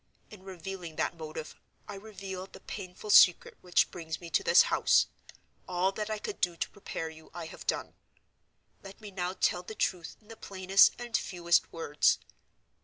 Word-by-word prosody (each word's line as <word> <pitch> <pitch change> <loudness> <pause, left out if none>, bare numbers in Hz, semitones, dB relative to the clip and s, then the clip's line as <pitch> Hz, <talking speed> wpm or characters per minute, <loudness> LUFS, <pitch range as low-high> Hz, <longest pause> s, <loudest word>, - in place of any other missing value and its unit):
In 210 -3 -12
revealing 185 -2 -7
that - - -1
motive, 155 -1 -7 0.3
I - - -6
reveal 195 -2 -7
the - - -14
painful 195 +1 -6
secret 180 -3 +6
which 180 -1 +2
brings 160 -2 -6
me 170 -1 -10
to - - +3
this 170 +1 +7
house. - - +3 0.6
All 185 +1 +1
that 210 +2 -4
I 215 - -1
could 400 - -6
do 175 -1 +1
to - - -2
prepare 165 -5 -5
you, 160 0 -15
I 170 -2 -5
have 160 - -11
done. - - -1 0.9
Let 195 0 -12
me 210 -2 -10
now 180 -1 -3
tell 180 -2 +1
the 215 +4 -9
truth 180 -5 -2
in 215 - -26
the 225 - -9
plainest 195 -1 +4
and 240 -2 -5
fewest 175 -2 +1
words. 150 -3 +2
185 Hz, 180 wpm, -30 LUFS, 170-195 Hz, 0.9 s, this